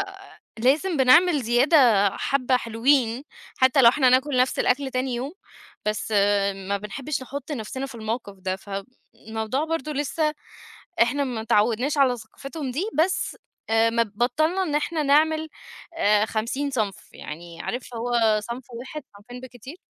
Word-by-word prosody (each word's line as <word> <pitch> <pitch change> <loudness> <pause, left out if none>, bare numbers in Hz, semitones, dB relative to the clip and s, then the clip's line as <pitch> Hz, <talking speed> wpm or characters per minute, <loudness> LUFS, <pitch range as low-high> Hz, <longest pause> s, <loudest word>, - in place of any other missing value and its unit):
أ 390 -1 -6 0.4
لازم 300 +9 +2
بنعمل 290 +4 +5
زيادة 240 - +4
حبة 255 -2 +1
حلوين، 235 +1 +1 0.3
حتى 260 +2 +4
لو 235 - +9
إحنا 260 +1 +2
هناكل 260 +2 +3
نفس 255 +1 +2
الأكل 265 +1 +1
تاني 255 -1 -1
يوم، 265 +6 -4 0.5
بس 215 +1 -2 0.6
ما 200 0 0
بنحبش 255 +8 -5
نحط 280 +3 -7
نفسنا 260 +1 -4
في 270 -2 -10
الموقف 220 -2 -4
ده، 185 0 -2
فالموضوع 220 +5 -5
برضو 320 -2 -3
لسه 300 +2 -1 0.7
إحنا 265 +5 +2
متعودناش 235 +2 0
على 265 -3 +4
ثقافتهم 270 +5 -7
دي، 345 - -2 0.2
بس 380 - -3 0.3
مب 225 0 +2
بطَّلنا 310 - +1
إن 305 -5 -2
إحنا 305 +1 -1
نعمل 310 +2 +3 0.8
50 235 +6 -2
صنف 215 -6 -3
يعني 165 +2 -9
عارف 245 0 -5
هو 230 -2 +2
صنف 235 +4 -6
واحد 265 +5 -7
صنفين 245 +5 -11
بالكتير 255 +4 -11
255 Hz, 135 wpm, -24 LUFS, 225-285 Hz, 0.8 s, لو